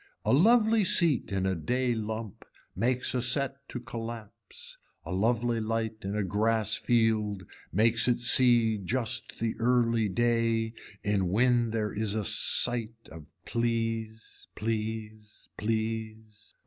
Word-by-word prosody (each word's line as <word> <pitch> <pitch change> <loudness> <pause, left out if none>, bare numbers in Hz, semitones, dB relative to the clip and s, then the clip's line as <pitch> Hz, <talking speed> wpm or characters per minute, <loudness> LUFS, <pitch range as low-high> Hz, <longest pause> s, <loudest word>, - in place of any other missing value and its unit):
A - - +2
lovely 220 - +4
seat 170 - +3
in 95 -1 -1
a 95 - 0
day 125 +9 -1
lump 110 -1 -6 0.3
makes 125 +1 0
a 125 - -1
set 135 +2 +1
to 125 - -5
collapse, 115 -2 -9 0.3
a 80 - -7
lovely 115 +4 0
light 110 0 -3
in 100 +2 -4
a 105 - -1
grass 110 +3 0
field 110 -4 0 0.3
makes 115 +5 +3
it 125 -1 +1
see 120 -3 +4
just 120 +4 -3
the 115 -1 -1
early 115 -2 +1
day 115 +1 0 0.3
in 100 -3 0
when 120 +3 +2
there 110 -2 -2
is 105 0 -2
a 110 - -1
sight 115 +1 +2
of 80 -2 -12 0.2
please 115 -1 -3
please 110 -1 -5
please. 110 -1 -5
115 Hz, 130 wpm, -28 LUFS, 110-120 Hz, 0.3 s, lovely